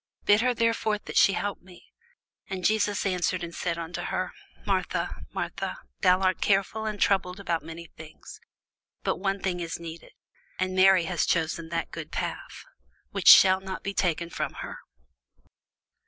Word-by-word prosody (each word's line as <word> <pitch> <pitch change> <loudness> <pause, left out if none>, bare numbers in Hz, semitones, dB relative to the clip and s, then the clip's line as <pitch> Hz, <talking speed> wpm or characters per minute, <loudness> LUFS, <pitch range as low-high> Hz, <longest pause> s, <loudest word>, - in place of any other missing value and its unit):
bid 205 +1 +5
her 250 0 +1
therefore 230 -2 +1
that - - -10
she 195 - +6
help 205 0 -3
me. 180 -1 -18 0.6
And 185 -2 -4
Jesus 210 -2 +1
answered 185 -1 0
and 170 0 -6
said 170 -1 -2
unto 170 +1 -5
her, - - -3 0.3
Martha, - - -1
Martha, - - -4 0.2
thou 185 -1 +4
art 185 -1 +1
careful 205 +2 +1
and 210 -1 -4
troubled 190 -1 +1
about 170 -4 -1
many 165 +1 -9
things: 160 -1 -13 0.6
but - - 0
one 195 +2 -1
thing 180 -2 -1
is 170 -1 -4
needful: 165 0 -9 0.5
and 185 0 -1
Mary 190 -1 +6
hath 170 -1 0
chosen 165 -1 0
that 165 0 -3
good - - -7
part, - - -2 0.7
which - - -3
shall 190 0 +9
not 190 -1 -6
be 200 - -3
taken 170 -3 0
away - - -17
from - - -3
her. - - -8
185 Hz, 165 wpm, -27 LUFS, 170-200 Hz, 0.7 s, shall